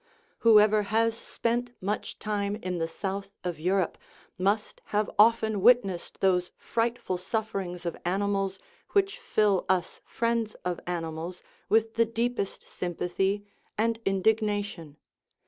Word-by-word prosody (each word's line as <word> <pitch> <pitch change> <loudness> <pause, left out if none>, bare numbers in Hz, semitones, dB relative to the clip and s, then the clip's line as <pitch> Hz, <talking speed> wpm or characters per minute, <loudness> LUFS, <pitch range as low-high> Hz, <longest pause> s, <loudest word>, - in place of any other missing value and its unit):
Whoever 215 -1 +6
has 225 +2 +1
spent 240 +1 -2
much 205 +3 -3
time 205 -1 -1
in 185 -4 -3
the 165 - 0
south 195 +3 -4
of 175 -3 -3
Europe 185 +1 +1 0.4
must 200 +3 0
have 210 0 0
often 220 -2 +5
witnessed 205 -6 +3
those 180 -2 +3
frightful 230 -5 -1
sufferings 190 -3 -3
of 170 - -2
animals 195 +1 0 0.4
which 400 +4 +2
fill 210 - +2
us 185 -2 0
friends 230 -2 -1
of 180 -1 -1
animals 170 0 -4 0.3
with 225 0 +3
the 230 - +5
deepest 230 -2 -2
sym 175 -1 -5
pathy 190 +4 0 0.3
and 225 +1 +1
indignation. 205 -5 0
205 Hz, 125 wpm, -28 LUFS, 185-225 Hz, 0.4 s, Whoever